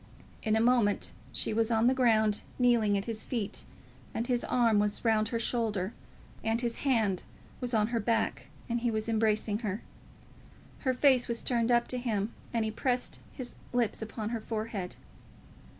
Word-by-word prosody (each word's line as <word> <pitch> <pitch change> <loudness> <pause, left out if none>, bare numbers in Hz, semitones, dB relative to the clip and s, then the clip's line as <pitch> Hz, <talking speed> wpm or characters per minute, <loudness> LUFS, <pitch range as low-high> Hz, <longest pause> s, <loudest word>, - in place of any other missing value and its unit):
In 220 0 +1
a 220 - +3
moment 235 -4 +3 0.2
she - - +1
was 225 +1 +2
on 225 0 +3
the 255 - +5
ground, 220 -5 +3 0.2
kneeling 235 -5 +3
at 195 - -3
his 225 -2 -3
feet, 225 -6 -2 0.5
and 230 - -1
his 245 -1 +1
arm 230 -4 +3
was 210 +2 0
round 215 -1 +3
her 230 - -1
shoulder, 225 -4 0 0.5
and 225 +1 +1
his 235 -1 -1
hand 220 -9 +1 0.4
was 245 -2 -1
on 215 0 +2
her 235 -1 0
back, 225 +2 0 0.2
and 235 0 0
he 240 0 0
was 220 -1 -1
embracing 215 -1 +1
her. 210 -2 -3 1.0
Her 260 -2 0
face 260 -2 +4
was 235 -1 -2
turned 235 -1 +1
up 240 0 +3
to 250 - -1
him, 220 -3 -1 0.2
and 230 -2 0
he 220 - -1
pressed 245 +2 -1
his 250 -2 -6 0.2
lips 240 -3 +1
upon 220 -1 -4
her 230 -1 -3
forehead. 215 -5 -4
230 Hz, 175 wpm, -30 LUFS, 215-240 Hz, 1.0 s, the